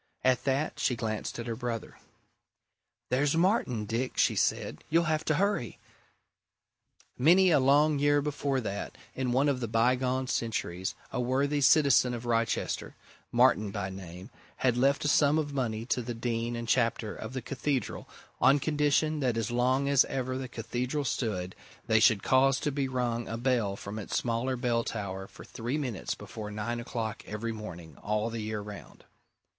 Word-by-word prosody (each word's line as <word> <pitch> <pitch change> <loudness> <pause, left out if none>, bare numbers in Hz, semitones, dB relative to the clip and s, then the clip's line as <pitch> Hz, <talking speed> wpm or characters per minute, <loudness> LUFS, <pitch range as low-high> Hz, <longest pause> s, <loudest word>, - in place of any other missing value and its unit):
At 130 -1 +2
that, 140 +3 0
she 125 - +1
glanced 110 -2 -3
at 115 - -5
her 115 -2 -3
brother. 115 -2 -5 1.1
"There's 140 +4 +2
Martin, 165 - +1
Dick!" 120 +4 -2
she - - +3
said. - - -1
"You'll 165 +2 +3
have 155 -1 0
to 155 - +2
hurry." 195 - 0 1.4
Many 180 +7 +6
a 150 - +5
long 145 +3 +4
year 145 0 +4
before 145 -2 -1
that, 100 -2 -5 0.2
in 130 -2 -2
one 135 +4 +3
of 140 -3 +1
the 120 - -2
bygone 125 +3 +1
centuries, 95 -7 -2 0.2
a - - -1
worthy 140 +4 +1
citizen 135 -3 +5
of 120 0 -7
Wrychester, 115 -1 -1 0.4
Martin 105 +2 +4
by 100 -2 -4
name, 95 +2 -9 0.2
had 125 -2 +1
left 135 +4 +2
a - - +2
sum 145 +1 +4
of 145 -2 -2
money 115 -5 -2
to 125 +1 0
the 120 0 -5
Dean 115 0 -2
and 115 0 -5
Chapter 115 -3 +1
of 110 +3 -7
the 130 - -3
Cathedral 135 0 -3 0.3
on 135 +2 +6
condition 150 +1 +1
that 125 -5 0
as 115 0 -1
long 130 +3 +2
as 140 -2 +5
ever 130 -1 -3
the 130 0 -4
Cathedral 125 +4 -3
stood, 95 -8 -2 0.3
they 110 -1 +4
should 110 -3 +4
cause 135 0 +4
to 150 - 0
be 140 -1 -1
rung 120 -2 -2
a 115 - -4
bell 120 -5 +1
from 100 +2 -7
its 105 - -3
smaller 120 +2 -1
bell 120 -1 0
tower 95 -4 -5
for - - -13
three 120 +5 -3
minutes 125 -9 -3
before 110 -2 -8
nine 110 +3 -3
o'clock 115 -2 -4
every 110 +2 -3
morning, 90 -8 -9
all 105 +2 -1
the 115 -1 -4
year 105 -1 -3
round. 105 0 -10
125 Hz, 170 wpm, -29 LUFS, 110-140 Hz, 1.4 s, Many